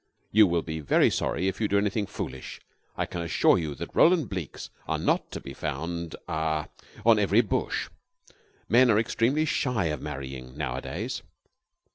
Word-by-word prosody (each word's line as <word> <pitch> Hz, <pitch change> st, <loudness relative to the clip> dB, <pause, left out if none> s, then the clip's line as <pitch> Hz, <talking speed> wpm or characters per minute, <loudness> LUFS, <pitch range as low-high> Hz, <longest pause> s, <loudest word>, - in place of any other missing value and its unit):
You 105 Hz, 0 st, +7 dB
will 85 Hz, -1 st, 0 dB
be 80 Hz, -1 st, -4 dB
very 75 Hz, -, +3 dB
sorry 95 Hz, -, 0 dB
if 95 Hz, +3 st, -2 dB
you 105 Hz, -, +2 dB
do 100 Hz, -, +2 dB
anything 100 Hz, 0 st, 0 dB
foolish. 65 Hz, -10 st, -6 dB, 0.4 s
I -, -, 0 dB
can 85 Hz, -, -5 dB
assure 85 Hz, +2 st, +3 dB
you 75 Hz, -4 st, -3 dB
that -, -, -7 dB
Roland 165 Hz, -5 st, +5 dB
Blekes 90 Hz, -7 st, -6 dB, 0.2 s
are -, -, 0 dB
not -, -, 0 dB
to -, -, -6 dB
be 70 Hz, -, -9 dB
found 85 Hz, +5 st, -4 dB
ah 80 Hz, -1 st, -1 dB, 0.4 s
on 115 Hz, -2 st, +6 dB
every 105 Hz, +3 st, +4 dB
bush. 110 Hz, -, -1 dB, 0.8 s
Men 125 Hz, +1 st, +5 dB
are 105 Hz, -, +5 dB
extremely 120 Hz, +7 st, +1 dB
shy 125 Hz, -, 0 dB
of 75 Hz, -, -5 dB
marrying 65 Hz, -2 st, -7 dB
nowadays." 65 Hz, -4 st, -3 dB
85 Hz, 165 wpm, -27 LUFS, 75-110 Hz, 0.8 s, You